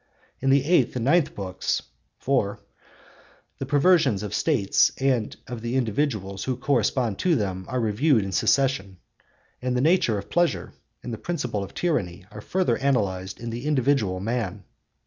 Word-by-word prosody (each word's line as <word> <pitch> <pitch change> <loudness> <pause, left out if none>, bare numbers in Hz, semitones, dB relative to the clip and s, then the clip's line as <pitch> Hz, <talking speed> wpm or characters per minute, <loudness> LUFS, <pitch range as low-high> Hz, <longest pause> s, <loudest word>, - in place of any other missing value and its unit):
In 135 - 0
the 135 0 +4
eighth 155 -8 +3
and 120 -2 -2
ninth 160 +3 +3
books 95 -2 -2 0.4
(4) 125 -7 0 1.0
the 135 - -4
perversions 145 - +3
of 105 - -5
States 125 -12 +2
and 130 -5 0
of 120 -2 -7
the 120 +2 -3
individuals 110 -6 -1
who 130 -2 -1
correspond 125 -4 0
to 180 -3 +2
them 95 -6 -2
are 130 - -2
reviewed 115 +2 +2
in 95 - -4
succession; 125 -5 +1 0.6
and 125 0 -1
the - - +2
nature 155 - +3
of 100 - -6
pleasure 175 -1 0 0.3
and 120 - -5
the 110 - -6
principle 125 -12 -3
of 95 - -10
tyranny 100 - -1
are 105 - -9
further 180 - 0
analysed 100 -9 -1
in 115 +1 -5
the 120 +5 -5
individual 130 -9 +1
man. 105 -2 -3
125 Hz, 160 wpm, -25 LUFS, 100-140 Hz, 1.0 s, the